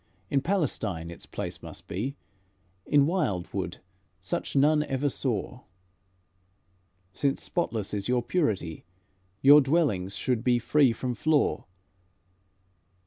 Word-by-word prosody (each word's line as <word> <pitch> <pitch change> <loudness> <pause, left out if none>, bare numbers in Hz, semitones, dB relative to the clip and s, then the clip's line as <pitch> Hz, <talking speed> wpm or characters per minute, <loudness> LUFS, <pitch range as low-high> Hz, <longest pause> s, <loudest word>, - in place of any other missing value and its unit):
In 140 - +2
Palestine 110 - -1
its 85 - -10
place - - -6
must - - -10
be; 120 +10 -3 0.7
In 145 -1 +5
wildwood 145 - -2 0.4
such 95 +8 -4
none 150 +2 +4
ever 145 -1 -1
saw. 125 -2 -2 1.5
Since 140 -1 -1
spotless 115 - -2
is 100 -1 -2
your 125 -1 +1
purity, 105 - -1 0.6
Your 145 +2 +9
dwellings 130 - +1
should 120 0 -1
be 125 -1 +3
free 135 +2 +3
from 125 +2 -3
flaw. 150 +5 +1
130 Hz, 110 wpm, -27 LUFS, 105-145 Hz, 1.5 s, Your